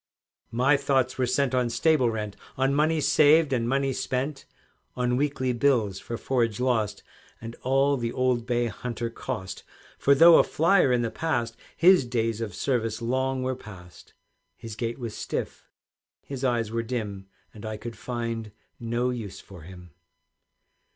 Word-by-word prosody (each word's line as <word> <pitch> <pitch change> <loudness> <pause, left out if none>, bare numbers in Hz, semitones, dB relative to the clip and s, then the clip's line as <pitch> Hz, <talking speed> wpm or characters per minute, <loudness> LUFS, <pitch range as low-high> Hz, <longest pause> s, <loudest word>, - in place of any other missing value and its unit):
My 130 +5 +3
thoughts 135 -2 0
were 125 - +2
set 130 +1 +1
on 125 -2 +1
stable 145 -1 +2
rent, 105 -2 -4 0.2
On 135 +1 +2
money 155 +2 +2
saved 150 0 +4
and 120 -2 0
money 135 0 +1
spent, 135 +3 -3 0.5
On 125 0 0
weekly 130 -2 0
bills 115 -7 +1
for 115 - -6
forage 120 -3 0
lost, 110 -5 0 0.4
And 115 +1 -8
all 135 +2 +2
the 120 -2 -2
old 125 -2 0
bay 120 -1 +1
hunter 120 0 -4
cost. 110 -6 -6 0.4
For 140 - +4
though 165 +4 +8
a - - +6
flier 170 -3 +3
in 120 -1 +2
the 115 - -2
past, 120 -8 -2 0.2
His 180 -2 +6
days 115 -2 -1
of 105 -5 -4
service 115 -4 -1
long 130 +2 -1
were 130 0 -1
past, 90 -7 -14 0.4
His 115 -2 -8
gait 115 +1 -3
was 115 -4 -6
stiff, - - -5 0.5
his 135 -1 -7
eyes 120 -4 0
were 115 0 -1
dim, 105 -5 -5 0.3
And 105 - -12
I 110 -1 -4
could 115 +2 -8
find 115 -2 -4 0.3
no 120 +2 -1
use 110 -6 -6
for 95 -4 -13
him. 90 +1 -12
120 Hz, 160 wpm, -26 LUFS, 115-135 Hz, 0.5 s, though